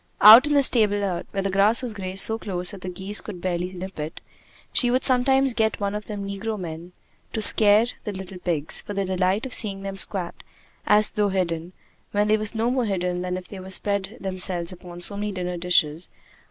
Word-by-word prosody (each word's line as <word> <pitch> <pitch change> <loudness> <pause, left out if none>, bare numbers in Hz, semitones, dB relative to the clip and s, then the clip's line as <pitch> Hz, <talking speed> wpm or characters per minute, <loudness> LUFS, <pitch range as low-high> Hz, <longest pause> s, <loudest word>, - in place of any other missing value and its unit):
Out 225 +7 +9
in 295 - 0
the 280 - +4
stable 215 -5 +2
lot, 195 -4 -3
where 195 -1 -4
the 195 - -2
grass 205 +6 +3
was 240 -3 0
grazed 190 -1 0
so 225 0 +2
close 180 -4 0
that 195 - -11
the 185 - -6
geese 190 +3 -2
could 195 -5 -9
barely 180 0 -3
nip 185 -1 -9
it, 150 +2 -6 0.5
she 245 - +2
would 255 +2 0
sometimes 265 0 +3
get 220 -1 -1
one 200 -1 -2
of 210 0 -6
the 210 - -7
negro 200 +2 -5
men 170 0 -8 0.4
to - - -3
scare 210 +1 +8 0.2
the 210 - -4
little 190 -1 -9
pigs, 160 -4 -2
for 205 - -8
the 195 0 -1
delight 185 +4 -1
of 260 - -7
seeing 195 -3 +3
them 195 0 -6
squat 185 -3 0 0.5
as 210 0 +4
though 210 -1 0
hidden, 175 -2 -3 0.4
when 205 +1 +1
they 215 +1 +3
were 215 - -4
no 230 +2 0
more 255 -2 -1
hidden 180 -3 -2
than 180 0 -3
if 180 -1 -10
they 200 - -10
had 190 0 -6
spread 200 +3 -2
themselves 185 -2 -2
out 180 - -14
upon 175 -1 -11
so 200 - -5
many 205 +1 -4
dinner 180 -2 -5
dishes. 170 -2 0
195 Hz, 220 wpm, -23 LUFS, 180-210 Hz, 0.5 s, Out